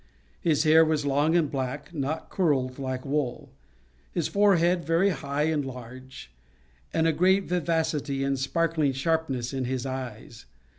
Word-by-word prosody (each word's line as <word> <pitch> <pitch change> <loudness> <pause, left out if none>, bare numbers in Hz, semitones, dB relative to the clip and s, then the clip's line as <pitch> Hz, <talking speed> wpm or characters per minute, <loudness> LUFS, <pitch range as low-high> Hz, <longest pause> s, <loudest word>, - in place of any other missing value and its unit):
His 155 -3 +2
hair 160 +1 +6
was 155 -2 0
long 145 +4 +2
and 165 -4 +2
black, 135 +4 -4
not 150 +1 -3
curled 135 -8 0
like 130 -1 -4
wool; 140 -3 -2 0.6
his 170 -4 -1
forehead 180 -4 +3
very 170 +5 +2
high 140 -1 -2
and 155 -2 +1
large; 130 - -10 0.6
and 160 - +1
a 165 - +3
great 190 +5 +3
vivacity 160 -6 -1
and 135 -1 0
sparkling 155 +1 0
sharpness 135 -3 -1
in 130 -1 -2
his 130 0 -3
eyes. 120 - -7
145 Hz, 145 wpm, -26 LUFS, 130-165 Hz, 0.6 s, hair